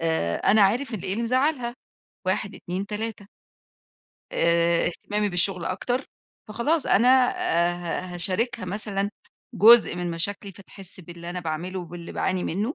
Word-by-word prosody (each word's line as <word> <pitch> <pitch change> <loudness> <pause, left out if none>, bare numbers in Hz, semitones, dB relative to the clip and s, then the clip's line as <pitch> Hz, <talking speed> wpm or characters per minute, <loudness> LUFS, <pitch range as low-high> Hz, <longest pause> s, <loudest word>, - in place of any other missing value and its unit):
آآ، 160 - 0
أنا 215 +1 +4
عارف 235 +6 +2
إن 210 - -4
إيه 185 - -3
اللي 230 +4 -2
مزعلها، 255 0 0 0.5
1 195 +2 -1
2 185 +3 -5
3 210 -1 -5 1.1
آآ، 170 0 +2
اهتمامي 205 +4 -2
بالشغل 180 -1 +2
أكتر، 245 +8 -2 0.4
فخلاص 260 +8 0
أنا 235 +5 +4 0.2
آآ، 170 +1 +1 0.3
ه 185 -1 -8
هاشاركها 190 +5 -2
مثلًا 200 +1 -2 0.4
جزء 225 -3 +7
من 175 -1 -3
مشاكلي، 195 +4 -2
فتحس 195 -1 -8
باللي 170 0 -9
أنا 180 0 -4
باعمله 170 +3 -4
وباللي 175 0 -9
باعاني 185 -1 -1
منه 210 - -2
195 Hz, 140 wpm, -25 LUFS, 175-220 Hz, 1.1 s, جزء